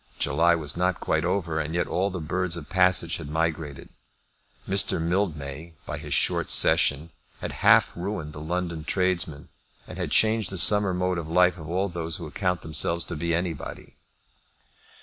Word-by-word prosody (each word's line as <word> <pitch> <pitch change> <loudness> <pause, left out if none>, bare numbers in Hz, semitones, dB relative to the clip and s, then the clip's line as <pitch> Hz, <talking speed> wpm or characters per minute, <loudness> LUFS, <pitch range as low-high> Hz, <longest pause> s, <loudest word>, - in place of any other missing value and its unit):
July 85 +1 +2
was 75 -3 -1
not 90 0 0
quite - - 0
over, 85 -5 -1
and 80 +1 -3
yet 85 - +1
all 95 +4 -1
the 90 -2 -5
birds 85 +2 -1
of 75 - -8
passage 95 -2 +2
had 75 -3 -8
migrated. 80 -2 -3 0.8
Mr. 100 -1 +3
Mildmay, 80 -3 -3
by - - -5
his - - -9
short - - +1
session, 75 +4 +3 0.3
had - - -5
half - - +5
ruined 85 -4 -5
the 75 - -8
London 85 0 -3
tradesmen, 90 -5 -1 0.4
and - - -9
had - - -2
changed 110 -3 +2
the 95 - -4
summer 100 +4 +6
mode 90 -1 -1
of 80 -1 -7
life 90 +1 +3
of 80 0 -9
all 95 +3 0
those 85 -3 -3
who 85 - -7
account 90 +3 -2
themselves 80 +2 0
to 85 - -5
be 85 +2 -1
anybody. 85 -1 -5
85 Hz, 170 wpm, -25 LUFS, 80-90 Hz, 0.8 s, summer